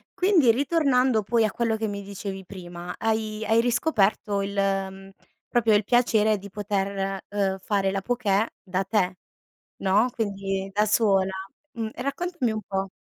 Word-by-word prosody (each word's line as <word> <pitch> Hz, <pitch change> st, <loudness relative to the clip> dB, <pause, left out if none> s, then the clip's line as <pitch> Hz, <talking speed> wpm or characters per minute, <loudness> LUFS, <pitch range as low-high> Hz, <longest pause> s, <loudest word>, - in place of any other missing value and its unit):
Quindi 360 Hz, -, +5 dB
ritornando 265 Hz, -4 st, +2 dB
poi 225 Hz, +2 st, +2 dB
a 210 Hz, -, -1 dB
quello 230 Hz, -2 st, 0 dB
che 220 Hz, 0 st, -2 dB
mi 200 Hz, 0 st, -4 dB
dicevi 195 Hz, -1 st, -6 dB
prima, 175 Hz, -2 st, -8 dB
hai 220 Hz, -1 st, -1 dB
hai 225 Hz, +1 st, +4 dB
riscoperto 220 Hz, -5 st, +1 dB
il, 200 Hz, 0 st, -3 dB
mhmm, 195 Hz, -1 st, -1 dB, 0.4 s
proprio 230 Hz, -3 st, +3 dB
il 205 Hz, -, +3 dB
piacere 220 Hz, -2 st, +3 dB
di 200 Hz, +1 st, -10 dB
poter, 195 Hz, -1 st, -2 dB
uhm, 195 Hz, -2 st, 0 dB
fare 195 Hz, -1 st, 0 dB
la 195 Hz, 0 st, -2 dB
pokè 220 Hz, -3 st, +1 dB, 0.2 s
da 190 Hz, 0 st, -1 dB
te, 190 Hz, -2 st, 0 dB, 0.6 s
no. 205 Hz, +6 st, +3 dB
Quindi 195 Hz, -3 st, -2 dB
da 210 Hz, +2 st, +2 dB
sola. 195 Hz, -3 st, +3 dB, 0.4 s
Mh, 230 Hz, -4 st, -4 dB
raccontami 280 Hz, -1 st, -2 dB
un 215 Hz, -, -3 dB
po'. 195 Hz, -1 st, -3 dB
205 Hz, 150 wpm, -25 LUFS, 195-230 Hz, 0.6 s, Quindi